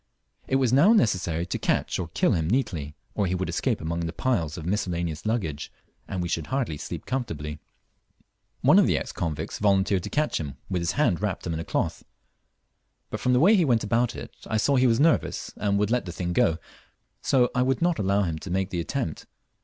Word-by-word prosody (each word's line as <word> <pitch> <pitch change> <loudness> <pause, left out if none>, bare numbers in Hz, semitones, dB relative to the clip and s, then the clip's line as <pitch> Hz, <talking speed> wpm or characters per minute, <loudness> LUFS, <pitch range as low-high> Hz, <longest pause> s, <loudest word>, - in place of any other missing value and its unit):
It 130 - +1
was 130 -3 +2
mow 170 - +6
necessary 90 - +1
to - - -3
catch - - 0
or - - -2
kill - - +1
him 80 -1 0
neatly, 85 - -1 0.2
or 100 - 0
he 90 - 0
would 95 0 -2
escape - - 0
among 85 +2 -3
the 85 -1 -2
piles 85 -3 -1
of 80 - -7
miscellaneous 85 -3 -2
luggage, 85 -11 -2 0.4
and 95 -2 -3
we - - -2
should 80 -2 -2
hardly 130 - -1
sleep 85 +1 -6
comfortably. 80 - -4 1.0
One - - +6
of - - +4
the - - +2
ex - - -4
convicts 80 -4 -4
volunteered 100 -2 +2
to - - -6
catch 150 +1 0
him 70 -5 -6
with 90 -2 0
his 85 +1 0
hand 120 - +1
wrapped 105 -3 -2
up 85 - -2
in 80 - -3
a - - -3
cloth, - - -2 1.1
but - - -3
from 125 - +2
the 125 - +4
way 195 +10 +6
he 185 - +4
went 120 -7 +2
about 115 +3 +1
it - - -8
I 110 - 0
saw 140 +6 +2
he 130 0 +4
was 115 -1 +3
nervous 160 +2 +1
and 100 -1 0
would 105 +1 +1
let 125 -4 +1
the 90 - -5
thing 85 +1 -3
go, 80 -2 +3 0.6
so 125 -2 +3
I 125 - +1
would 130 0 +1
mot 175 0 +1
allow 100 0 +2
him 80 -4 -2
to 95 - -8
make 95 +2 -1
the 90 - -2
attempt. 105 - -3
95 Hz, 220 wpm, -26 LUFS, 85-125 Hz, 1.1 s, mow